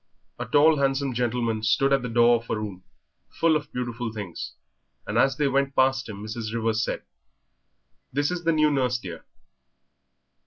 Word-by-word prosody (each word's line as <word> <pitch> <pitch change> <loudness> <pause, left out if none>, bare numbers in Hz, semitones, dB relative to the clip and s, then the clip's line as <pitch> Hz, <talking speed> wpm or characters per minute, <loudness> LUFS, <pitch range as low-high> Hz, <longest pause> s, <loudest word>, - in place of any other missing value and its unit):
A - - -4
tall, 150 +1 +5
handsome 135 -1 0
gentleman 115 -2 -1
stood 135 +5 +2
at 135 - +3
the 125 - -4
door 120 +1 +5
of 115 0 -12
a - - 0
room 100 -4 -6 0.5
full 165 -1 +2
of 150 0 -3
beautiful 120 -2 -4
things, 100 -6 -6 0.5
and - - -4
as 135 -1 +3
they 150 - +2
went 140 0 0
past 130 -2 +2
him 100 -1 -7
Mrs. 110 0 -5
Rivers 115 -1 0
said, - - -3 1.1
"This 145 +4 0
is 180 -1 -3
the 165 - +3
new 155 -1 +3
nurse, 125 -3 +1
dear." 90 -7 -9
125 Hz, 170 wpm, -25 LUFS, 115-140 Hz, 1.1 s, tall